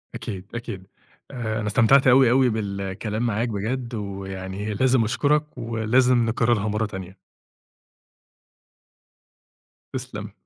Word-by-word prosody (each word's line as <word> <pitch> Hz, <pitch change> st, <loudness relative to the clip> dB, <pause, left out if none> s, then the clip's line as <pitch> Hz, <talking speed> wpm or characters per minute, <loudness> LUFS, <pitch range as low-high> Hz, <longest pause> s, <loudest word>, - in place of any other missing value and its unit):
أكيد، 110 Hz, -5 st, -6 dB
أكيد. 95 Hz, -5 st, -6 dB, 0.4 s
آآ، 110 Hz, -4 st, -3 dB
أنا 105 Hz, -, -3 dB
استمتعت 120 Hz, +6 st, +4 dB
أوي، 130 Hz, -1 st, +6 dB
أوي 130 Hz, 0 st, +4 dB
بالكلام 105 Hz, +1 st, -3 dB
معاك 115 Hz, +1 st, 0 dB
بجد، 115 Hz, +4 st, -3 dB
وي 100 Hz, -2 st, -5 dB
يعني 95 Hz, +3 st, -5 dB
لازم 130 Hz, +2 st, +3 dB
أشكرك، 150 Hz, +6 st, 0 dB
ولازم 115 Hz, +2 st, +2 dB
نكررها 115 Hz, -2 st, +1 dB
مرة 105 Hz, +1 st, 0 dB
تانية. 95 Hz, -2 st, -8 dB, 2.8 s
تسلم. 115 Hz, -5 st, -6 dB
110 Hz, 110 wpm, -24 LUFS, 100-125 Hz, 2.8 s, أوي